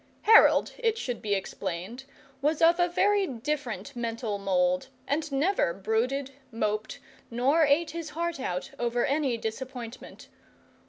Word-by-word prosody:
Harold, 445 +1 +6
it 455 -2 +1
should 245 - -4
be 205 -2 0
explained, 195 +5 -5 0.4
was 300 +2 +1
of 335 +1 +5
a 350 - +4
very 400 +2 +2
different 260 - -4
mental 230 -3 -3
mould, 180 +1 +1 0.2
and 300 +1 -1
never 275 - +1
brooded, 235 +7 -1 0.2
moped, 215 -1 -2 0.3
nor 275 +7 +3
ate 300 +4 +2
his 330 -1 -5
heart 340 -2 -2
out 185 -1 -3
over 240 0 0
any 275 -4 0
disappointment. 240 +1 -7
255 Hz, 130 wpm, -28 LUFS, 220-310 Hz, 0.4 s, Harold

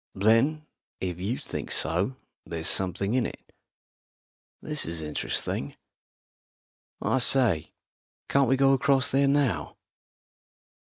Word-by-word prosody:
"Then, 115 +10 +2 0.3
if 90 -2 -4
you 105 +7 -2
think - - -6
so, 95 +11 +1 0.3
there's 80 -1 -6
something 95 +3 -1
in 125 -1 +1
it. - - -13 1.1
This 150 -1 -2
is 80 -1 -3
interesting. 75 -1 -3 1.3
I 130 - +1
say, 120 - +3 0.5
can't 140 -3 +2
we 135 - +3
go 135 0 +4
across 135 0 +2
there 140 +1 +3
now?" 135 - 0
120 Hz, 110 wpm, -27 LUFS, 90-135 Hz, 1.3 s, go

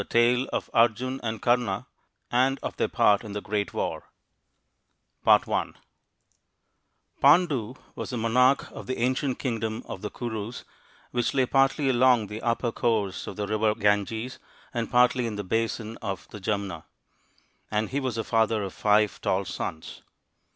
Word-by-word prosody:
Tale 120 +2 +3
of - - -2
Arjun 120 +3 +2
and 110 -2 -4
Karna, 120 -5 +1 0.5
and 130 +2 +3
of - - -4
their - - +1
Part 100 +1 +3
in 105 -2 -7
the 105 - -2
Great 105 -1 -2
War - - -2 1.2
THE - - -36
FIVE - - +6
TALL - - -4
SONS - - -11 1.4
OF - - -34
PANDU 165 +6 +7
PANDU 125 -1 -3 0.2
was - - -6
the 125 - -3
monarch 125 +4 +3
of - - -9
the 130 - -2
ancient 130 +2 0
kingdom 110 -3 -3
of 95 - -7
the 105 - -4
Kurus, 115 0 -5 0.5
which 120 +1 0
lay 130 -2 +4
partly 135 +2 +2
along 125 -3 +4
the 105 +2 -7
upper 115 0 0
course 110 -5 -1
of - - -6
the 105 - -2
River 110 +1 +1
Ganges 110 +3 0 0.3
and 115 -2 -2
partly 125 0 +3
in 110 - -4
the 105 - -4
basin 115 +2 -2
of 95 -1 -5
the 105 - -9
Jumna; 100 -5 -3 0.8
and 105 0 -1
he 140 - -1
was 130 -4 -2
the 115 - -2
father 110 -2 +1
of 95 - -5
five 105 0 +2
tall 95 +1 0
sons. 80 -3 -6
115 Hz, 170 wpm, -26 LUFS, 105-125 Hz, 1.4 s, PANDU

